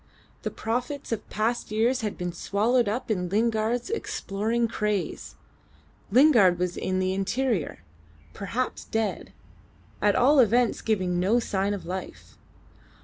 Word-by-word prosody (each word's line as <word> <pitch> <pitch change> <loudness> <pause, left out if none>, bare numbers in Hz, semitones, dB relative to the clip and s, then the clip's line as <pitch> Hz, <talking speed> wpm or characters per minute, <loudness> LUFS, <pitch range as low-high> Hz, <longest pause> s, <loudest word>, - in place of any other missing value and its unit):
The - - -2
profits 250 +5 -3
of 220 -2 -3
past 225 +3 -1
years 235 +4 +1
had 210 -2 -3
been 180 -1 -3
swallowed 215 +6 +1
up 235 +2 -3
in 180 -4 -1
Lingard's 225 - 0
exploring 230 - -1
craze. 210 -3 -3 0.7
Lingard 230 - +6
was 180 0 -1
in 185 0 -2
the 185 0 0
interior 200 - -1 0.5
perhaps 230 +6 -3
dead 225 -1 -2 0.7
at 205 -1 +3
all 275 +4 +5
events 240 0 +3
giving 185 -5 0
no 205 +7 +3
sign 200 -2 -1
of 195 - -9
life. 170 - -7
215 Hz, 130 wpm, -26 LUFS, 190-240 Hz, 0.7 s, Lingard